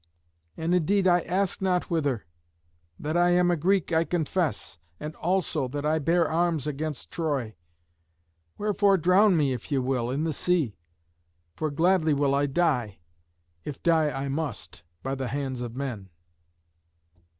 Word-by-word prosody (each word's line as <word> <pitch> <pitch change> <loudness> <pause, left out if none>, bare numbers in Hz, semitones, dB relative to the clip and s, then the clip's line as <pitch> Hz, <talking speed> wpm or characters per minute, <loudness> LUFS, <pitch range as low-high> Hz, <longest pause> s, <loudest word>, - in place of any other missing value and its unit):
And 165 +2 -1
indeed 185 +3 +2
I 180 -1 +5
ask 185 +3 -1
not 180 -2 0
whither. 140 - 0 0.7
That 155 +2 -3
I 175 0 +4
am 175 0 +4
a - - +3
Greek, 180 +1 +1
I 160 0 +4
confess, 160 - -2 0.2
and 155 +1 -6
also 175 -6 0
that 145 +3 -4
I 155 +1 +2
bare 165 +3 +2
arms 165 -3 0
against 150 0 -4
Troy. 140 -9 -2 1.0
Wherefore 205 -1 +3
drown 185 +3 +4
me, 140 -4 +2
if 125 - -7
ye 140 - +2
will, 125 -2 0
in 140 +4 -1
the 160 -1 -1
sea. 160 - 0 0.8
For 155 - -2
gladly 160 +1 +2
will 140 -1 +2
I 140 +1 +2
die, 135 - 0 0.7
if 145 - -7
die 160 -3 +3
I 140 -1 -3
must, 145 +2 -4 0.2
by 135 - -2
the 135 -1 -3
hands 135 -2 -3
of 120 -1 -5
men." 120 -8 -5
155 Hz, 150 wpm, -26 LUFS, 135-175 Hz, 1.0 s, I